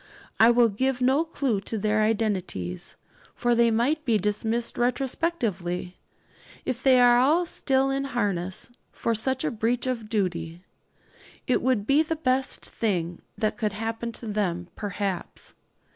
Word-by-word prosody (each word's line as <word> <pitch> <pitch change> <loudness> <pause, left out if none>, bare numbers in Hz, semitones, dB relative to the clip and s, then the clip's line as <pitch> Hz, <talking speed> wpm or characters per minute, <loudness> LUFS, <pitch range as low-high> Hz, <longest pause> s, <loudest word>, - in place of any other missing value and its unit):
I 225 - +8
will 240 -1 +5
give 255 +5 -1
no 265 +5 +3
clue 275 -10 -1
to 220 +3 -4
their 215 +1 +1
identities; 190 - -2 0.4
for 240 0 +1
they 235 0 +4
might 255 +8 +1
be 230 -6 +2
dismissed 220 +4 -1
retrospectively, 240 - -1 0.7
if 255 0 -2
they 260 -2 +5
are 255 +8 +5
still 270 -4 +1
in 275 0 -1
harness, 200 -6 -2 0.2
for 230 - -1
such 260 +4 0
a - - 0
breach 235 +2 0
of 235 -4 -3
duty. 175 -5 -2 0.8
It 255 - +1
would 250 -5 +1
be 280 +6 +4
the 320 +1 -1
best 265 -3 0
thing 175 -6 -2 0.2
that 215 -1 -1
could 210 -2 -1
happen 225 +2 -3
to 230 - -7
them, 180 -5 -2
perhaps. 200 -3 -4
230 Hz, 145 wpm, -26 LUFS, 205-255 Hz, 0.8 s, I